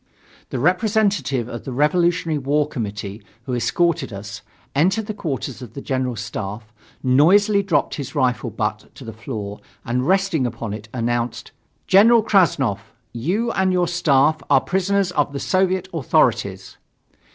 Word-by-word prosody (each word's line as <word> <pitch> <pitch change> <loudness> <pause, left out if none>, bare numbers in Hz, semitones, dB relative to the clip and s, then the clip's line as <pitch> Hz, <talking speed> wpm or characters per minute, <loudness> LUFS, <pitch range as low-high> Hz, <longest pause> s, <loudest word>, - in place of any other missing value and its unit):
The - - -3
representative 185 - +1
of 120 -1 -7
the 135 - -6
Revolutionary 165 +3 +1
War 145 +2 +1
Committee, 105 -5 -5 0.2
who 125 - -5
escorted 170 - 0
us, 100 0 -8 0.3
entered 190 +9 +2
the 215 - -4
quarters 140 - -4
of 125 - -10
the - - -5
General 130 -2 -1
Staff, 110 -1 -6 0.3
noisily 195 +11 +4
dropped 170 -8 0
his 140 +1 -6
rifle 125 -4 0
butt - - -3
to - - -11
the 115 - -7
floor 110 -3 -6 0.3
and 125 +2 -1
resting 190 -8 +2
upon 115 -2 -5
it, 110 +1 -8
announced: 120 0 -2 0.3
"General 220 +4 +6
Krassnov, 140 - +2 0.3
you 185 - -1
and 190 -3 +1
your 180 -1 +2
staff 155 -2 +2
are 135 -2 +5
prisoners 190 0 0
of 145 -4 0
the 140 - -3
Soviet 185 +1 +1
authorities." 155 -7 0
145 Hz, 145 wpm, -21 LUFS, 120-185 Hz, 0.3 s, General